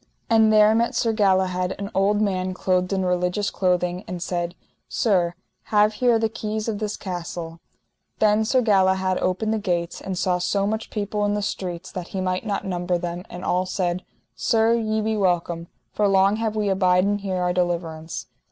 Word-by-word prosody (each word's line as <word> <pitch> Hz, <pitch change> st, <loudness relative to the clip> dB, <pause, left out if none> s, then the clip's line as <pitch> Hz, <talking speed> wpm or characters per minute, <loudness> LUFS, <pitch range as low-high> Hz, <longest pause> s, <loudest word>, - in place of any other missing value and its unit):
And 220 Hz, -1 st, +5 dB
there 215 Hz, 0 st, +6 dB
met 235 Hz, +1 st, +1 dB
Sir 225 Hz, -1 st, +1 dB
Galahad 190 Hz, -3 st, +1 dB
an 200 Hz, +1 st, -5 dB
old 205 Hz, +2 st, +2 dB
man 185 Hz, -3 st, -1 dB
clothed 180 Hz, 0 st, 0 dB
in 190 Hz, -1 st, 0 dB
religious 180 Hz, +3 st, 0 dB
clothing, 180 Hz, 0 st, 0 dB
and 180 Hz, 0 st, -5 dB
said: 175 Hz, 0 st, -3 dB, 0.3 s
Sir, 180 Hz, -6 st, +1 dB, 0.3 s
have 210 Hz, 0 st, +3 dB
here 240 Hz, -2 st, +5 dB
the 225 Hz, 0 st, +1 dB
keys 215 Hz, 0 st, -4 dB
of 215 Hz, -3 st, -2 dB
this 210 Hz, -1 st, -3 dB
castle. 170 Hz, -2 st, -6 dB, 0.6 s
Then 215 Hz, 0 st, +3 dB
Sir 250 Hz, +3 st, +2 dB
Galahad 190 Hz, -3 st, +2 dB
opened 200 Hz, +4 st, 0 dB
the 220 Hz, -, 0 dB
gates, 175 Hz, -4 st, -2 dB
and 190 Hz, -1 st, -4 dB
saw 180 Hz, -1 st, +1 dB
so 195 Hz, +2 st, 0 dB
much 220 Hz, +2 st, -2 dB
people 210 Hz, 0 st, -2 dB
in 205 Hz, 0 st, +1 dB
the 205 Hz, -, -2 dB
streets 180 Hz, -2 st, -4 dB
that 180 Hz, -2 st, -6 dB
he -, -, 0 dB
might 185 Hz, +3 st, -2 dB
not 200 Hz, -, -2 dB
number 180 Hz, -1 st, -1 dB
them, 175 Hz, +1 st, -5 dB
and 180 Hz, +1 st, -7 dB
all 180 Hz, +1 st, +1 dB
said: 180 Hz, -1 st, -1 dB, 0.3 s
Sir, 225 Hz, -1 st, +2 dB
ye 220 Hz, -2 st, 0 dB
be 220 Hz, +1 st, 0 dB
welcome, 175 Hz, -4 st, 0 dB, 0.3 s
for 210 Hz, -, +2 dB
long 195 Hz, +1 st, +4 dB
have 220 Hz, -1 st, -1 dB
we 210 Hz, -1 st, 0 dB
abiden 190 Hz, +1 st, +2 dB
here 195 Hz, -2 st, -3 dB
our 180 Hz, 0 st, 0 dB
deliverance. 170 Hz, -3 st, -2 dB
190 Hz, 185 wpm, -23 LUFS, 180-210 Hz, 0.6 s, there